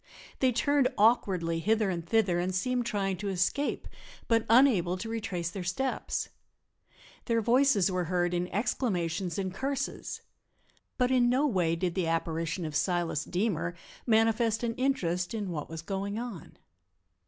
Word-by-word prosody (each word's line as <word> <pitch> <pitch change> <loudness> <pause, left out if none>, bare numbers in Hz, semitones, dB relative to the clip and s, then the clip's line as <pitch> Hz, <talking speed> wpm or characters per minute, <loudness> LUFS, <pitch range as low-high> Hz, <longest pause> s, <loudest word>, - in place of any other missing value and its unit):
They 260 -1 +3
turned 275 +3 +2
awkwardly 185 -7 +2
hither 215 +2 +1
and 170 -2 -3
thither 185 -1 +2
and 180 +1 -1
seemed 245 +4 0
trying 195 -3 -1
to 200 +1 -3
escape, 190 +10 -1 0.4
but 230 -1 +2
unable 225 -8 +4
to 205 - -6
retrace 190 -7 -3
their 190 0 -5
steps. 220 +10 -2 1.0
Their 230 -2 +1
voices 235 -4 +3
were 180 -1 -1
heard 175 +1 0
in 175 0 0
exclamations 185 -5 -1
and 190 -2 -2
curses. 270 +6 -3 0.8
But 250 0 +2
in 245 -2 +4
no 260 +4 +2
way 180 - +1
did 175 0 -1
the 180 -2 -1
apparition 165 +1 -1
of 155 -2 -5
Silas 175 -2 0
Deemer 175 -3 -1 0.3
manifest 225 0 +2
an 230 -1 0
interest 210 -8 -1
in 205 -4 -3
what 150 -3 -5
was 165 0 -7
going 195 +3 -3
on. 230 -8 -7
195 Hz, 150 wpm, -29 LUFS, 175-230 Hz, 1.0 s, unable